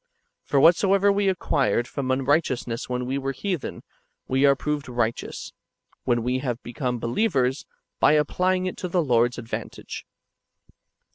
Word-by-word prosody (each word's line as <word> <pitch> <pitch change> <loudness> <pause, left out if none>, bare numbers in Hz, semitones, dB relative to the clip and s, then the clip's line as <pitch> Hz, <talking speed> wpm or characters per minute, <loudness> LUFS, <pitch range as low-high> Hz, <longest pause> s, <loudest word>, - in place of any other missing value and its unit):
"^ - - -38
For 140 - +3
whatsoever 195 +6 +5
we 200 0 +2
acquired 140 -9 +1
from 140 -3 -4
unright 135 +4 +3
eousness 120 -2 -4
when 125 0 -2
we 135 +2 -1
were 135 0 -2
heathen, 180 +2 -4 0.4
we 135 +2 +3
are 140 - +5
proved 150 -1 -3
righteous, 120 -2 -3 0.5
when 120 -2 +1
we 125 +2 0
have 125 -3 -3
become 125 +1 -3
believers, 130 - 0 0.3
by - - +5
applying 185 +5 +1
it 185 - -3
to 180 - -3
the 175 -1 +1
Lord's 120 -2 +2
advantage. 115 - -6
135 Hz, 150 wpm, -25 LUFS, 125-170 Hz, 0.5 s, whatsoever